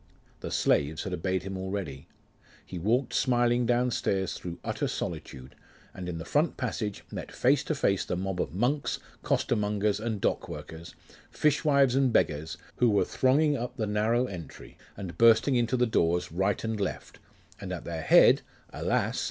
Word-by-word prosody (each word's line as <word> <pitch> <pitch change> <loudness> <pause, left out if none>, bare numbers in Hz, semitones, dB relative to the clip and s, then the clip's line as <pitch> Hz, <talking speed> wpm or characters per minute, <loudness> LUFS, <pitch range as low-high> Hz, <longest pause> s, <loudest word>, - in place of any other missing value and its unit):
The - - -6
slaves 75 +2 +1
had 95 - -4
obeyed 95 +1 -1
him 95 0 -5
already. 95 +1 -5 0.6
He 90 - -7
walked 120 +8 +1
smiling 120 -1 +2
downstairs 120 -6 0
through 85 -1 -7
utter - - -2
solitude, 65 +1 -6 0.4
and 90 -1 -6
in 85 - -4
the 80 - -6
front 150 - +1
passage 110 -5 -3
met - - -6
face 135 +2 +2
to 155 - -1
face 100 -8 +1
the - - -3
mob 95 0 -2
of - - -3
monks, 125 - 0 0.2
costermongers 105 -2 0
and 110 -1 -3
dock - - -1
workers, 85 +1 -9 0.3
fishwives 140 -3 +3
and 135 -1 +3
beggars, 80 -4 0 0.2
who 125 - +4
were 100 -2 +3
thronging 145 +3 +2
up 125 -1 -5
the 110 - -1
narrow 110 +4 +1
entry, 90 - -9 0.2
and 95 -3 -7
bursting 115 +3 +5
into 120 +1 +1
the 125 - +3
doors 90 -5 +1
right 95 +4 0
and 110 -1 -2
left; 100 - -4 0.4
and - - -6
at - - -5
their 85 -1 -4
head, - - +6 0.3
alas! - - 0
105 Hz, 165 wpm, -28 LUFS, 90-125 Hz, 0.6 s, head